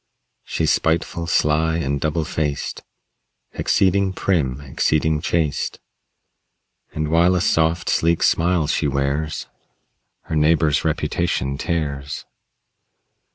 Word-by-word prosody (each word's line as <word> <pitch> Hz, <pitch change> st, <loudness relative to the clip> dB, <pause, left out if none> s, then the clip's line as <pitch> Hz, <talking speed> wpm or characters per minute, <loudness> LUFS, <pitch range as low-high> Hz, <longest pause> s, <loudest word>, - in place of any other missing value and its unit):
She's -, -, 0 dB
spiteful, 85 Hz, +1 st, 0 dB
sly 80 Hz, +1 st, +2 dB
and 70 Hz, -3 st, -2 dB
double 80 Hz, 0 st, 0 dB
faced, 75 Hz, -2 st, -3 dB, 0.7 s
Exceeding 95 Hz, 0 st, +2 dB
prim, 70 Hz, -10 st, 0 dB
exceeding 75 Hz, +2 st, 0 dB
chaste. 80 Hz, -3 st, -1 dB, 1.1 s
And 75 Hz, 0 st, -3 dB
while 85 Hz, +3 st, +4 dB
a -, -, +2 dB
soft, 80 Hz, 0 st, +1 dB
sleek 85 Hz, 0 st, +2 dB
smile 85 Hz, -1 st, +2 dB
she 75 Hz, +1 st, 0 dB
wears, 70 Hz, +3 st, -1 dB, 0.8 s
Her -, -, -4 dB
neighbor's 75 Hz, -1 st, +3 dB
reputation 70 Hz, -6 st, -1 dB
tears. 75 Hz, -3 st, -3 dB
80 Hz, 100 wpm, -21 LUFS, 75-85 Hz, 1.1 s, while